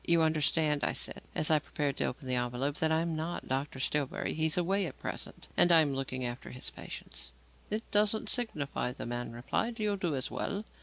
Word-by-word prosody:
"You 170 -1 +4
understand," 155 -1 +2
I - - +2
said, - - -1
as 155 - +3
I 155 - +6
prepared 145 -1 -2
to - - +1
open 130 +1 -4
the 130 - 0
envelope, 125 +4 0
"that 160 0 +2
I 160 0 +3
am 165 -1 -1
not 160 +3 -3
Dr. 135 +1 -2
Stillbury. 140 0 0
He 160 0 +2
is 155 - +2
away 190 +2 +2
at - - -8
present - - -5
and 175 - +6
I 165 -1 +9
am 145 -3 +1
looking 130 -1 -2
after 120 +1 -5
his 125 - -4
patients." 65 +1 -7 0.4
"It 215 +2 -1
doesn't 210 +1 +3
signify," 150 - -1
the - - -6
man 120 0 -3
replied. 225 - -1
"You'll 210 -1 +1
do 175 -6 0
as 130 - -2
well." 205 +2 -2
150 Hz, 215 wpm, -32 LUFS, 130-170 Hz, 0.4 s, I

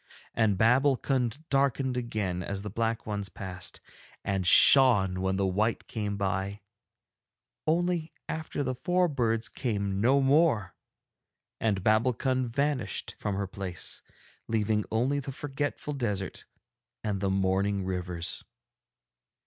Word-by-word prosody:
And 110 -4 +2
Babbulkund 130 - +2
darkened 135 -1 +2
again 110 -7 -2
as 100 +2 -4
the 105 - -5
black 115 +1 -1
ones 100 -2 -3
passed, 95 -2 -5 0.4
and 95 -2 -1
shone 100 -6 +6
when 95 0 +1
the 100 0 +1
white 105 +5 0
came 105 -3 -3
by; 100 +1 -2 1.1
only 170 0 +1 0.2
after 160 -2 -3
the 130 -1 -1
four 180 +7 +1
birds 115 -6 0
came 100 -5 -2
no 130 +5 +4
more, 135 - +3 0.9
and 100 -4 0
Babbulkund 125 +4 +2
vanished 140 -3 -1
from 100 -2 -2
her 100 0 -1
place, 95 -2 -3 0.5
leaving 110 -1 +1
only 125 +6 +1
the 135 0 -5
forgetful 145 +2 -3
desert 105 -8 -3 0.6
and 105 -3 -2
the 100 - +1
mourning 95 +1 +1
rivers. 90 -2 -3
110 Hz, 120 wpm, -29 LUFS, 95-135 Hz, 1.1 s, shone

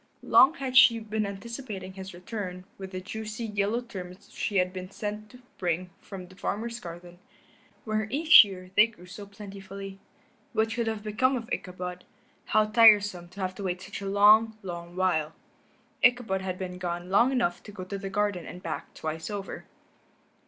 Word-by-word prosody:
Long 270 +5 +6
had 265 -4 -4
she 255 -3 +8
been 215 -1 -2
anticipating 200 -2 -7
his 190 0 -8
return 180 0 -6
with 190 -1 -6
the 185 -1 -5
juicy, 220 +3 -5
yellow 210 +2 0
turnips 185 -6 -9
which - - -14
he 205 - 0
had 180 0 +2
been 185 -1 -6
sent 210 +1 -5
to 250 +2 -16 0.2
bring 180 0 -1
from 190 -3 -9
the 185 +1 -16
farmer's 230 +5 -3
garden, 175 -1 -10 0.7
where 215 -1 -1
each 310 +5 +9
year 185 -2 -9
they 210 +2 +7
grew 220 -6 -16
so 200 +3 -10
plentifully. 195 -1 -9 0.5
What 220 0 +1
could 235 -1 -1
have 220 -2 -3
become 255 +5 +1
of 235 -2 -4
Ichabod? 180 -1 -5 0.4
How 215 0 +3
tiresome 210 -5 +5
to 190 +3 -10
have 185 0 -1
to 200 - -8
wait 180 -1 -2
such 190 +2 -8
a 200 - -4
long, 215 +2 +5
long 175 -1 -7
while. 165 -4 +1 0.7
Ichabod 245 -6 +3
had 185 -1 -4
been 180 -1 -6
gone 175 0 -4
long 235 +6 +5
enough 235 -10 0
to 210 - -11
go 195 -2 -7
to 195 +2 -5
the 195 -1 -5
garden 205 -3 -1
and 180 - -9
back 165 - -5
twice 160 +3 -4
over. 200 -2 -6
200 Hz, 180 wpm, -28 LUFS, 185-220 Hz, 0.7 s, each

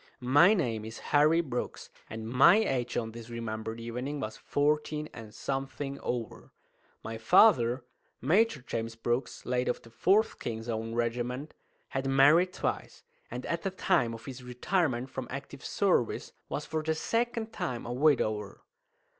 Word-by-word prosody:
My 175 +9 +7
name 115 - -1
is 110 +1 -7 0.2
Harry 155 +3 +5
Brooks, 125 -7 -5 0.2
and 110 0 -6
my 130 - +6
age 130 - 0
on 115 -2 -2
this 115 0 -10
remembered 110 -1 -4
evening 125 +5 -4
was 110 -5 -4
fourteen 150 +1 0
and 110 -2 -9
something 135 +2 -4
over. 120 -2 -4 0.5
My 115 0 -5
father, 125 - +5 0.4
Major 185 - +2
James 115 -2 -4
Brooks, 120 +3 -2
late 125 0 0
of - - -1
the 115 - -15
4th 200 - +2
(King's 115 0 -5
Own) 115 0 -3
Regiment, 120 +4 -2 0.4
had 135 0 -2
married 145 +7 +5
twice, - - -4 0.3
and 125 +1 -6
at 170 0 -2
the 195 - -1
time 120 -10 +1
of 110 -1 -12
his 130 -1 -7
retirement 125 +1 -1
from - - -5
active - - -7
service - - +1 0.2
was - - -3
for 155 0 -2
the 160 +1 0
second 230 +4 -1
time 120 -2 -3
a 120 - -3
widower. 115 -8 +1
125 Hz, 155 wpm, -30 LUFS, 115-155 Hz, 0.5 s, My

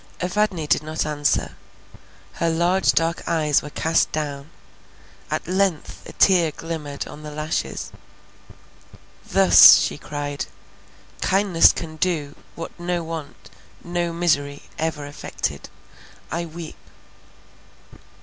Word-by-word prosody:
Evadne 185 -2 0
did 150 - +2
not 155 0 -3
answer; 145 -1 0 0.8
her 170 - 0
large 175 +3 +2
dark 165 +1 0
eyes 155 -3 +2
were 150 - -8
cast 160 +2 +1
down, 145 -1 -4 0.8
at - - -3
length 185 -3 -1
a - - -10
tear 180 -4 +4
glimmered 150 -3 -6
on 150 - -10
the 150 - -8
lashes. 155 +1 -4 1.4
"Thus," - - +9
she - - -1
cried, 145 -1 -5 0.7
"kindness 190 -3 +4
can 160 -1 -7
do, 155 -4 -1 0.2
what 165 - -6
no 175 0 -2
want, 160 -3 -8 0.3
no 175 0 -2
misery 145 -4 0 0.2
ever 155 -2 -2
effected; 145 +1 -5 0.6
I 170 +1 -2
weep." 160 -5 -9
160 Hz, 110 wpm, -22 LUFS, 150-175 Hz, 1.4 s, Thus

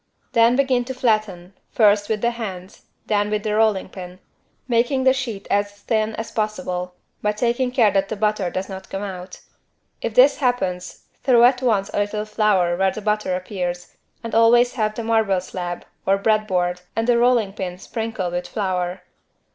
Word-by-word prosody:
Then 230 +1 +4
begin 260 -2 +2
to 260 +1 -5
flatten, 215 -7 -1 0.2
first 205 -2 +3
with 215 -2 -1
the 235 - +2
hands, 195 -5 -8 0.2
then 205 -1 +1
with 210 -1 -1
the 215 -1 -1
rolling 215 -3 +2
pin, 180 -1 -10 0.5
making 245 +2 +1
the 260 0 +5
sheet 235 -7 -5
as 205 0 +1
thin 215 +1 -1
as 225 - -6
possible, 185 -4 -3 0.3
but 210 0 -1
taking 240 +2 +1
care 240 -5 +3
that 195 0 0
the 220 - -2
butter 210 -3 0
does 185 +2 -4
not 190 -1 -9
come 195 +1 -4
out. 185 -2 -7 0.6
If - - -3
this - - +6
happens 190 - -2 0.2
throw 245 -3 +5
at 250 +1 +5
once 215 -6 +1
a - - 0
little 210 +1 -1
flour 210 -5 +2
where 190 +2 +2
the - - -6
butter 210 -3 0
appears 180 -1 -4 0.3
and 230 - -6
always 240 +2 +5
have 215 -3 -1
the 230 - -4
marble 220 -4 +2
slab 180 -1 -6 0.2
(or 195 +1 +4
bread 215 +1 +1
board) 180 -2 0
and 225 +1 0
the 240 -1 +4
rolling 235 -5 +3
pin 180 -3 -5
sprinkled 220 -4 -4
with 175 0 -3
flour. 185 -3 -2
210 Hz, 180 wpm, -22 LUFS, 185-230 Hz, 0.6 s, this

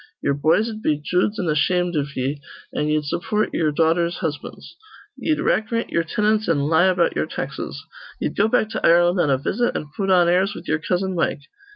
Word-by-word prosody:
Ye'er 140 - +2
boys'd 215 +10 +1
be 150 -8 +1
joods 180 +7 0
an' 180 - -1
ashamed 175 +3 +1
iv 140 -1 -3
ye, 135 +3 -2 0.3
an' 150 - -1
ye'd 150 0 +1
support 210 +8 -1
ye'er 155 -2 +1
daughters' 170 +3 +1
husbands. 155 - -6 0.4
Ye'd 310 -1 -1
rackrint 230 +2 0
ye'er 170 - +1
tinants 210 +5 0
an' 155 -4 +2
lie 160 +5 +3
about 180 -2 +2
ye'er - - -1
taxes. - - -6 0.3
Ye'd - - -3
go 205 - +3
back 220 -2 +1
to - - -4
Ireland 175 +2 +4
on 150 - +1
a 135 - +3
visit, 240 - -1
an' 150 - -7
put 195 -1 -2
on 180 -2 +5
airs 190 +4 +2
with - - -10
ye'er 155 - 0
cousin 185 +3 -1
Mike. 165 -4 -1
175 Hz, 200 wpm, -22 LUFS, 150-205 Hz, 0.4 s, on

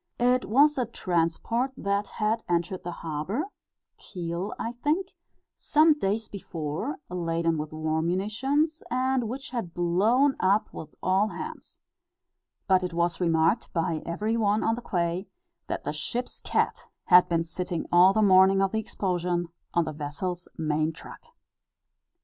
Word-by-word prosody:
It 250 +1 +2
was 280 +6 +4
a 245 - 0
transport 190 +7 -1
that 200 +1 -1
had 220 +1 -1
entered 175 +2 0
the 175 - -4
harbour 170 - -3 0.6
Kiel, 175 +2 -4
I 230 - -3
think 300 +10 -1 0.5
some 310 +1 +4
days 220 -5 -1
before, 170 - -4
laden 165 -2 -1
with 150 0 -4
war 155 0 -1
munitions, 255 - 0
and 255 -2 0
which 270 +3 -6
had 225 -10 -4
blown 215 +11 +3
up 200 +3 +2
with 155 - -9
all 190 +3 +3
hands. - - -8 0.9
But 190 -2 +4
it 180 -2 -3
was 170 +1 0
remarked 165 +5 +2
by 165 -2 -1
every 210 +7 -2
one 210 -1 +2
on 225 - +2
the 240 - -4
quay, 175 -2 -1 0.4
that - - -3
the - - -3
ship's 245 0 -3
cat - - -1 0.2
had 180 -1 +6
been 165 -1 +1
sitting 175 0 -3
all 180 +2 +7
the 215 +2 +2
morning 190 0 +6
of 195 -1 +2
the 220 - 0
explosion, 175 -4 -2 0.3
on 170 -1 +3
the 155 - -4
vessel's 155 +5 -4
main 155 0 0
truck. - - -12
185 Hz, 150 wpm, -27 LUFS, 170-230 Hz, 0.9 s, all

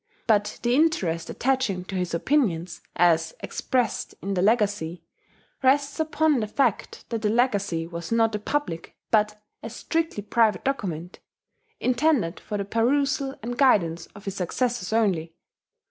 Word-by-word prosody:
But 210 -2 +1
the 240 0 +2
interest 225 - +1
attaching 245 -8 0
to 195 - -8
his 180 -2 -1
opinions, 175 - 0
as 175 - +3
expressed 250 -5 -1
in 195 +1 -2
the 180 - 0
Legacy, 200 -5 +1 0.6
rests 280 +2 +2
upon 315 -2 +2
the 215 - -2
fact 240 -1 -1
that 230 -2 -2
the 210 - +1
Legacy 205 -8 +1
was 170 +2 -7
not 225 -1 +3
a 210 - -1
public, 210 - -3 0.2
but 210 -1 +2 0.2
a - - -6
strictly 325 -10 -2
private 225 0 +2
document, 180 - -3 0.6
intended 250 - +1
for 210 - -5
the 200 - -3
perusal 270 +5 +1
and 240 +2 -4
guidance 170 -11 +3
of 205 - -12
his 195 - -3
successors 225 +2 -1
only. 180 -8 +1
215 Hz, 145 wpm, -25 LUFS, 180-260 Hz, 0.6 s, as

